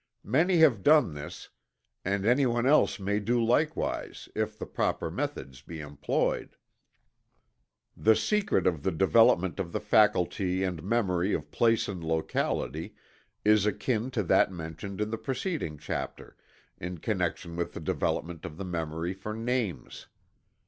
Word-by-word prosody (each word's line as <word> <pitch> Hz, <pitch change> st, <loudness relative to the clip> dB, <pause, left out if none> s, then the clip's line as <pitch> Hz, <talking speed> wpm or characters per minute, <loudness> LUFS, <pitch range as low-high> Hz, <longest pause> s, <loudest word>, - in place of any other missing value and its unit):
Many 165 Hz, -, +3 dB
have 145 Hz, -11 st, +5 dB
done 150 Hz, -, +5 dB
this, 75 Hz, 0 st, -8 dB, 0.5 s
and 100 Hz, +1 st, -1 dB
anyone 120 Hz, 0 st, +3 dB
else 145 Hz, -4 st, +4 dB
may 100 Hz, +2 st, 0 dB
do 120 Hz, +3 st, +1 dB
likewise 125 Hz, +7 st, 0 dB
if 110 Hz, 0 st, -2 dB
the -, -, -5 dB
proper -, -, -1 dB
methods 65 Hz, -1 st, -4 dB
be 80 Hz, +3 st, -9 dB
employed. 75 Hz, -2 st, -2 dB, 1.4 s
The 110 Hz, 0 st, +4 dB
secret 210 Hz, -, +1 dB
of 85 Hz, -5 st, +1 dB
the -, -, +1 dB
development 95 Hz, +1 st, +4 dB
of 85 Hz, -3 st, -3 dB
the -, -, -1 dB
faculty 95 Hz, -3 st, +2 dB
and 90 Hz, -4 st, -2 dB
memory 95 Hz, -2 st, +1 dB
of 75 Hz, -1 st, -6 dB
place 115 Hz, -1 st, +2 dB
and 90 Hz, -4 st, -5 dB
locality 80 Hz, -2 st, -2 dB, 0.5 s
is 105 Hz, -1 st, +5 dB
akin 110 Hz, +3 st, -1 dB
to 105 Hz, -, +2 dB
that 90 Hz, -, +3 dB
mentioned 90 Hz, +4 st, -6 dB
in 105 Hz, 0 st, -1 dB
the 115 Hz, -, -3 dB
preceding 135 Hz, -, -3 dB
chapter, -, -, -5 dB, 0.4 s
in 90 Hz, +1 st, -5 dB
connection 85 Hz, -2 st, -2 dB
with 85 Hz, 0 st, -3 dB
the -, -, -6 dB
development 85 Hz, -1 st, -2 dB
of 75 Hz, -, -7 dB
the 95 Hz, -, -5 dB
memory 85 Hz, 0 st, -3 dB
for 105 Hz, +3 st, -6 dB
names. 115 Hz, -4 st, -3 dB
100 Hz, 140 wpm, -29 LUFS, 85-115 Hz, 1.4 s, have